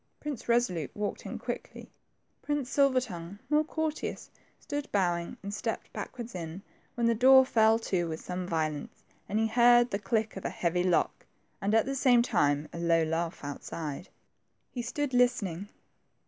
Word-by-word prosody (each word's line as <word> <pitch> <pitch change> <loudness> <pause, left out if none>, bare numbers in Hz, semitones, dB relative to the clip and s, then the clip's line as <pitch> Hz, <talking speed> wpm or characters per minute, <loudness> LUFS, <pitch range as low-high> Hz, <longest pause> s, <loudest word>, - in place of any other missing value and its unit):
Prince 295 -6 -5
Eesolute 210 - +1
walked 210 0 -3
in - - -5
quickly. - - -7 0.5
Prince 290 -3 -2
Silver 275 -2 +4
tongue, 185 -6 -7
more 300 +1 +4
courteous, 315 0 -3 0.3
stood 290 -1 -5
bowing, 175 -4 0
and 200 +1 -5
stepped - - -4
backward 240 -1 -6
in, 170 +1 -6 0.3
when 235 - 0
the 230 - +4
door 260 +3 +7
fell 225 -3 +4
to 185 -6 -1
with 160 0 -4
some 180 0 -5
violence, 155 -4 -3 0.3
and 210 - 0
he 225 - +2
heard 240 +1 +5
the 200 - -1
click 220 0 -1
of 195 - -7
a - - -1
heavy 175 +1 0
lock, 180 -2 0 0.3
and 205 +2 +1
at 225 - +4
the 275 - -2
same 250 -3 +5
time 145 -8 +1
a 170 - -6
low 165 -1 +3
laugh 165 +1 -2
outside. 145 +3 -6 0.6
He 245 - -4
stood 260 +3 -3
listening. 205 -7 +1
210 Hz, 165 wpm, -29 LUFS, 170-245 Hz, 0.6 s, door